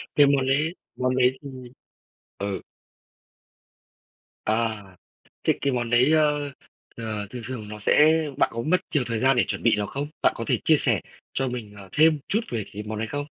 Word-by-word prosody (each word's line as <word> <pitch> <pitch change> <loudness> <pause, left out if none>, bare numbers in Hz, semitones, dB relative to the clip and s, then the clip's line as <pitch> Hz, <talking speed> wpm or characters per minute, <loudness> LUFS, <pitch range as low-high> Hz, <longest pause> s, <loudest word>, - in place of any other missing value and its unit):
cái 145 - +7
món 140 -2 +3
đấy 150 +6 +1 0.2
món 125 0 +1
đấy 130 0 +3
thì 140 - -8 0.9
ừ. 100 -1 -3 1.8
À. 110 -1 0 0.6
Thế - - +4
cái 140 - +1
món 120 -2 -1
đấy, 125 +5 +4
ơ, 150 -2 +2 0.5
ờ, 110 -3 -4
thường 125 -1 -7
thường 110 -5 -6
nó 105 0 -7
sẽ 155 +9 +5 0.2
bạn - - +3
có 115 - -3
mất 180 +8 +2
nhiều 145 -4 +2
thời 115 -2 -2
gian 135 0 +4
để 120 - +4
chuẩn - - -3
bị 115 -2 +4
nó 105 -1 -1
không? 140 +6 -4
Bạn - - +5
có - - -4
thể - - +2
chia - - +6
sẻ - - +2 0.3
cho 135 -1 0
mình, 115 -4 -6
ờ, 100 -1 -11
thêm 155 0 +5
chút 215 - +2
về 115 -4 -2
cái 105 - -5
món 105 0 -5
đấy 115 - -2
không? 145 0 -3
125 Hz, 195 wpm, -25 LUFS, 110-145 Hz, 1.8 s, cái